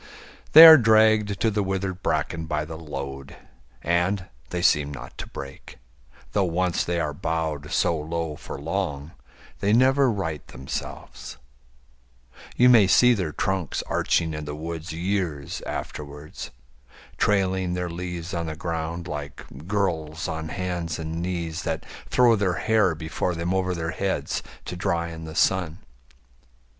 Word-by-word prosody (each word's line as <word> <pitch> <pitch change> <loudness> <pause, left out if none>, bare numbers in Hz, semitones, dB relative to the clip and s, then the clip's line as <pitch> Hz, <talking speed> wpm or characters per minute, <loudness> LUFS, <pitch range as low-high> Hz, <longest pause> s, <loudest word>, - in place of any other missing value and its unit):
They 160 +2 +13
are 160 -2 +11
dragged 110 -3 +4
to 110 - +3
the 105 0 0
withered 95 -1 -2
bracken 80 -1 -1
by 75 -1 -1
the 80 +1 -7
load, 70 -3 -7 0.5
And 90 +3 +1 0.2
they 90 0 -3
seem 75 -3 +3
not 70 - -9
to - - -5
break; 70 -1 -10 0.5
though 100 - +2
once 90 0 0
they 85 0 -1
are 75 -3 -1
bowed 80 -2 -3
So 85 - +2
low 80 0 -3
for 70 - -8
long, 75 -2 -3 0.5
they 100 +1 +2
never 130 +3 +4
right 85 -9 -3
themselves: 60 -1 -7 1.2
You 125 - +5
may 115 -6 +7
see 125 +7 +6
their 90 -8 -2
trunks 95 -1 -2
arching 80 -2 0
in 75 0 -5
the 75 0 -5
woods 80 +2 -6
Years 85 -4 -2
afterwards, 75 0 -6 0.7
trailing 95 -3 +1
their 90 0 -2
leaves 85 0 -5
on 85 -2 -2
the 80 - -4
ground 85 +1 -4
Like 75 -3 -6 0.2
girls 80 -6 -1
on 80 0 -4
hands 90 -3 -3
and 80 +1 -4
knees 85 -2 -3
that 80 -2 -3 0.2
throw 120 -2 +5
their 100 -4 +1
hair 105 -3 +2
Before 80 +2 -2
them 85 +2 -2
over 95 -1 0
their 80 -1 -3
heads 95 +2 -2 0.2
to - - -5
dry 85 -2 -1
in 80 -1 -8
the 80 -1 -8
sun. 85 -4 +1
85 Hz, 150 wpm, -25 LUFS, 80-95 Hz, 1.2 s, They